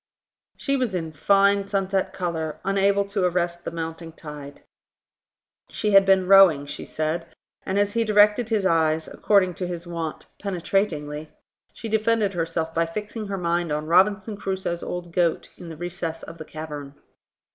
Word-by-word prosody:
She 275 - 0
was 245 -7 -1
in 160 -3 -3
fine 200 +5 +3
sunset 195 -1 0
colour, 160 -4 -3
unable 200 +1 +2
to 200 -1 -2
arrest 175 -1 0
the - - -3
mounting 165 0 -6
tide. 150 -3 -10 1.1
She 210 - -1
had 195 -1 +6
been 190 -1 +4
rowing, 190 -7 +7
she 145 - -7
said; 155 +2 -2 0.4
and, 190 - 0
as 205 0 +1
he 230 - +2
directed 210 +2 +4
his 215 -4 +1
eyes, 160 -2 +2
according 195 -3 +2
to 180 - -1
his 175 -1 -5
wont, 165 -2 -5 0.2
penetratingly, 165 -6 -2 0.4
she 225 - -7
defended 220 -1 +1
herself 165 -1 -2
by 165 0 +1
fixing 210 +4 -5
her 195 0 -3
mind 170 -2 -1
on 150 +1 -2
Robinson 200 +5 +3
Crusoe's 190 -3 -3
old 175 -1 -6
goat 170 -2 +1
in 175 - -10
the 160 - -8
recess 170 -1 -5
of 165 0 -10
the 155 - -7
cavern. 150 -3 -8
180 Hz, 160 wpm, -24 LUFS, 165-200 Hz, 1.1 s, rowing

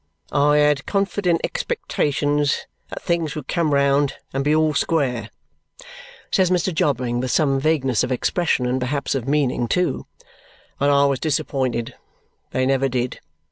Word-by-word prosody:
"I 145 +1 +3
had 150 -2 +2
confident 195 -3 0
expectations 145 - -1 0.2
that - - -7
things 170 -3 -1
would 150 -4 -6
come 170 -4 0
round 140 0 +2 0.2
and 135 +1 -1
be 150 +2 +2
all 155 -1 +2
square," 140 -7 0 1.0
says 185 -3 +3
Mr. 180 0 +1
Jobling 125 -6 0
with 130 +1 -2
some 140 -1 +2
vagueness 135 -5 +1
of 125 - -2
expression 135 +1 0
and 125 +1 -1
perhaps 140 +3 -1
of 135 -2 -3
meaning 135 -4 +1
too. 180 +8 -1 0.7
"But 140 - +2
I 140 0 +4
was 140 -2 +1
disappointed. 130 -6 -1 0.6
They 130 - 0
never 135 0 +2
did. 125 0 -2
140 Hz, 145 wpm, -21 LUFS, 130-155 Hz, 1.0 s, I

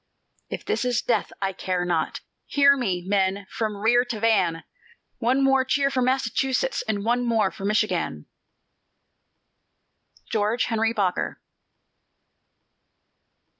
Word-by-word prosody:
"If - - -6
this 230 - -1
is 245 -1 0
death, 240 - 0
I 195 0 0
care 180 -1 -2
not! 170 -3 -1 0.3
Hear 280 0 +5
me, 190 -9 -2
men, 195 0 0
from 215 -2 -2
rear 235 +4 +3
to 235 -3 -4
van! 190 -7 +2 0.6
One 255 +3 +2
more 270 -1 +4
cheer 275 +1 +1
for 260 - 0
Massachusetts, 265 - 0
And 205 -1 -2
one 240 +2 +1
more 225 -5 +1
for 195 - -8
Michigan!" 210 +1 0 2.1
GEORGE 220 +2 +1
HENRY 225 0 0
BOKER. 195 -5 -1
225 Hz, 120 wpm, -24 LUFS, 200-250 Hz, 2.1 s, Hear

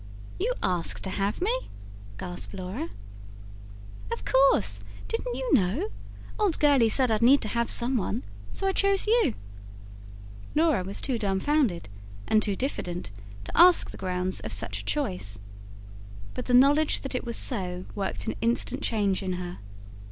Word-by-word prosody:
"You 445 +7 +1
asked 175 -2 -1
to 190 - -3
have 200 - -1
me?" - - -1 0.5
gasped 180 - -7
Laura. 185 - -5 1.2
"Of - - -4
course 105 - +3 0.3
didn't 480 +2 -3
you - - -1
know? 185 - +2 0.5
Old 405 -6 +2
Gurley 280 -6 +5
said 255 +1 +2
I'd 220 - +1
need 265 +4 +6
to - - -2
have 235 +1 0
some 245 +2 +2
one; 100 - -2 0.3
so - - -3
I 385 - +3
chose 395 0 +2
you." 435 - +3 1.2
Laura 310 - +3
was 195 +2 -5
too 255 -4 0
dumbfounded, 200 - +1 0.4
and 215 - +4
too 205 -2 0
diffident, 180 - -3 0.3
to 100 - -7
ask 355 +1 +6
the - - -10
grounds 185 0 -2
of 110 - -6
such 100 0 -2
a - - -15
choice. 100 0 -2 1.0
But - - -5
the 245 - +4
knowledge 290 +4 +4
that 270 - -5
it 250 - -2
was 235 -1 -2
so, 180 -6 -1
worked 195 -2 -3
an 220 - -1
instant 240 +3 0
change 205 -6 0
in 185 -1 -2
her. 180 0 -6
220 Hz, 160 wpm, -27 LUFS, 180-285 Hz, 1.2 s, need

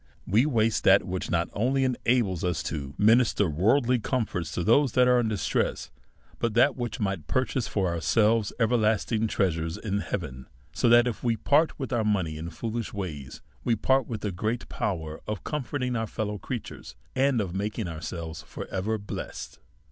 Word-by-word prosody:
We 115 +9 +3
waste 115 -5 +1
that 95 +1 +6
which 95 -1 -4
not 85 0 +1
only 130 +5 +1
enables 120 -7 +1
us 90 -3 -1
to 70 -3 -5
minister 110 -1 +4
worldly 115 - +2
comforts 105 - -2
to 90 - -1
those 130 +6 +4
that 125 0 +5
are 125 0 +5
in 120 - +1
distress, 100 -9 -1 0.5
but 115 -2 -1
that 120 - +5
which 120 -2 -4
might 95 -8 -2
purchase 130 - 0
for 95 -3 0
ourselves 105 +6 +2
everksthig 110 -1 +2
trea 95 -2 +2
sures 80 0 -4
in 100 -2 -2
heaven. 70 -11 -5 0.3
So - - +2
that, 120 +1 +7
if 120 -4 -3
we 115 -2 +1
part 145 +8 +2
with 135 -2 -4
our 115 -2 +1
money 95 -7 0
in 80 +2 -5
foolish 115 +6 -4
ways, 75 -10 -6 0.2
we 115 - +2
part 130 +3 +2
with 110 -3 -5
a 105 - -1
great 110 +7 -2
p(>v> 90 -6 -2
er 80 0 -7
of 105 -2 -4
com 150 -3 -2
forting 125 -2 -2
our 115 -1 -1
fellow 105 -2 -3
creatures, 100 - -7 0.2
and 135 -2 +3
of 95 -5 -2
making 105 +1 -2
ourselves 80 0 -6
for - - -8
ever 100 +4 -1
blessed. 100 -1 -7
105 Hz, 185 wpm, -27 LUFS, 90-120 Hz, 0.5 s, that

